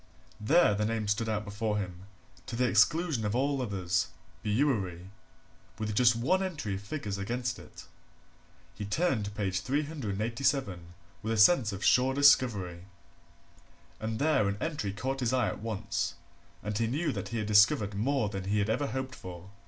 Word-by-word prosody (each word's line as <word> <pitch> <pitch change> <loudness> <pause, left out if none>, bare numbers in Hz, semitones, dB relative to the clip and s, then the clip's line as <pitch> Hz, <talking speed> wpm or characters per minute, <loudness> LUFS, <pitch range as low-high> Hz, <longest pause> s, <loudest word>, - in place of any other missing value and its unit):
There 125 +2 +4
the 105 +1 -1
name 110 -1 -1
stood 110 +2 0
out 105 -1 -1
before 105 +1 -2
him, 90 -2 -5 0.4
to 120 - -5
the 125 +1 +2
exclusion 145 - +3
of 105 +1 -1
all 140 +1 +1
others 90 -6 -1 0.3
Bewery 105 -7 0 0.7
with 105 -1 -3
just 120 +2 +5
one 170 +12 +1
entry 160 - -3
of 95 - -4
figures 100 -3 -4
against 120 +4 -2
it. - - -12 0.9
He 105 - -7
turned 115 - 0
to - - -3
page 100 -3 -2
387 120 - -2 0.3
with 110 +1 -2
a - - -1
sense 110 0 +5
of 100 0 -4
sure 130 +1 +4
discovery. 105 -11 +3 1.1
And 110 0 -3
there 145 -6 +2
an 100 - -3
entry 145 -9 -2
caught 130 +7 -3
his 125 -1 0
eye 130 -1 +2
at - - -6
once 110 -2 -3 0.5
and 105 0 -3
he 115 +2 +1
knew 150 +6 0
that - - -4
he 115 - -4
had 110 - -1
discovered 105 0 +4
more 115 +3 0
than 95 -2 -5
he 100 +2 0
had 105 +1 +1
ever 140 +5 0
hoped 130 +3 -4
for. 90 -3 -10
110 Hz, 170 wpm, -30 LUFS, 100-130 Hz, 1.1 s, just